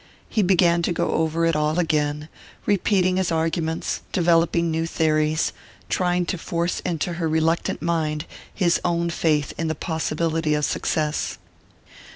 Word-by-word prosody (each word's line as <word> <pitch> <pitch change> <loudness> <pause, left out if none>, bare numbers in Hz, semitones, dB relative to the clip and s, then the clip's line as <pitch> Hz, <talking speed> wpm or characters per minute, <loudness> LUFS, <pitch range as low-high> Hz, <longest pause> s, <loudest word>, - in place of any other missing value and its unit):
He 220 - 0
began 175 -2 +4
to 170 - 0
go 170 - 0
over 160 +1 +1
it 165 -1 +2
all 150 +1 +1
again 150 -3 0 0.4
repeating 185 -2 +2
his 185 -2 0
arguments, 160 0 -1
developing 170 -1 +2
new 165 +1 -1
theories, 155 -1 +1 0.4
trying 180 -1 +1
to 180 0 -3
force 170 +1 -1
into 175 0 -2
her 165 - +1
reluctant 160 0 0
mind 155 -3 -1 0.3
his 175 -4 +1
own 170 -1 0
faith 155 -3 +1
in 165 - 0
the 160 - -1
possibility 160 -1 -1
of 150 -1 +1
success. 155 -1 -1
165 Hz, 145 wpm, -23 LUFS, 155-170 Hz, 0.4 s, began